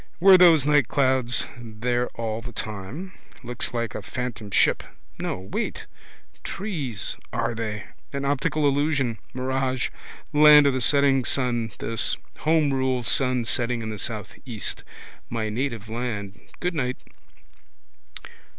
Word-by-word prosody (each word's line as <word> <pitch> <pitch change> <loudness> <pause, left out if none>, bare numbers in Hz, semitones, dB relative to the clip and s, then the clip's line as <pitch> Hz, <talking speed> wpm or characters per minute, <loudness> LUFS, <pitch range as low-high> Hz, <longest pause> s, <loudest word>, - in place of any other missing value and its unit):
Were 190 +2 +8
those 170 -6 +7
nightclouds 130 -4 +3
there 120 +2 -1
all 110 -1 -2
the 120 +1 -8
time? 110 - -6 0.3
Looks 120 0 -2
like 115 -2 -2
a - - -5
phantom 120 -2 -5
ship. - - +3 0.4
No. 95 - -3
Wait. 95 - -4 0.6
Trees 145 - -3
are - - -1
they? 110 -2 -4 0.3
An 140 0 -3
optical 145 +2 +1
illusion. 140 -5 +1
Mirage. 130 0 -1 0.4
Land 150 0 +8
of 140 - +4
the 130 - -1
setting 140 +1 +3
sun 120 -4 0
this. 115 -1 -1 0.2
Homerule 135 -5 +2
sun 125 -2 +2
setting 120 0 0
in 110 - -4
the 105 - -6
southeast. 110 +2 -4 0.5
My 115 -2 -2
native 115 -2 -3
land, 105 -4 -5
goodnight. 145 -8 -1
125 Hz, 120 wpm, -25 LUFS, 115-140 Hz, 0.6 s, Were